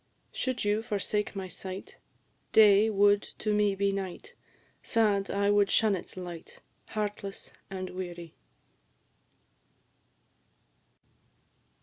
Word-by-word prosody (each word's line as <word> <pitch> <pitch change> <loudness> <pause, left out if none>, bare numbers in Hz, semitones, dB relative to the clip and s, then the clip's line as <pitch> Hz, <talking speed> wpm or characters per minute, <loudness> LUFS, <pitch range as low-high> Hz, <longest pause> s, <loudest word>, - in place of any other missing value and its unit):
Should 255 -4 -2
you 205 +1 +2
forsake 210 -1 -2
my 190 -1 -4
sight, 185 +2 -8 0.5
Day 210 0 +6
would 205 0 +4 0.2
to 215 - -1
me 210 -1 +2
be 200 0 +1
night; 195 -2 -5 0.5
Sad, 205 -4 +2
I 200 0 +1
would 205 -1 +4
shun 215 -2 +3
its 185 0 -6
light, 175 -3 -8 0.3
Heartless 205 -2 -5 0.2
and 185 -1 -5
weary. 175 -2 -7
200 Hz, 100 wpm, -29 LUFS, 190-210 Hz, 0.5 s, Day